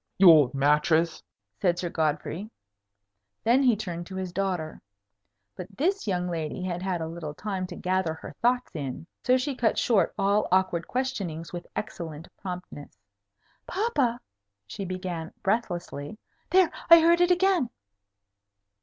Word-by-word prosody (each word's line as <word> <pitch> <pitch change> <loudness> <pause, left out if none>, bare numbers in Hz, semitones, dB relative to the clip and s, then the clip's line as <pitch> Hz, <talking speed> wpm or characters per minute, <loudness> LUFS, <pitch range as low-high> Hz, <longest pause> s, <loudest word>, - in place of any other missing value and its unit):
"You 185 -2 +9
old 150 -6 +5
mattrass!" 150 +4 +2 0.4
said 175 -2 +2
Sir 175 -1 -2
Godfrey. 160 +5 -2 0.9
Then 240 +4 +4
he 250 -4 +4
turned 175 -5 -5
to 190 - -8
his 185 -2 -4
daughter. 180 -5 -2 0.7
But 190 +2 -9
this 375 - 0
young 180 -2 0
lady 165 +1 -3
had 180 -1 -3
had 185 -2 -2
a 160 - -2
little 160 -2 -6
time 190 -2 -3
to 180 - -8
gather 185 -3 -1
her - - -9
thoughts 245 +1 +2
in. 140 0 -5 0.2
So 255 0 +4
she 270 +2 -2
cut 240 -3 +1
short 200 -8 +2
all 200 +2 +2
awkward 185 -3 +2
questionings 200 -12 -3
with 175 -1 -6
excellent 165 -6 -6
promptness. 180 - -8 0.7
"Papa!" 285 - 0 0.5
she 150 - -6
began, 180 -3 -5
breathlessly. 185 -6 -2 0.3
"There! 370 -2 +4 0.2
I 335 0 +11
heard 340 +1 +4
it 355 - +4
again!" 360 -7 +3
185 Hz, 145 wpm, -27 LUFS, 165-235 Hz, 0.9 s, I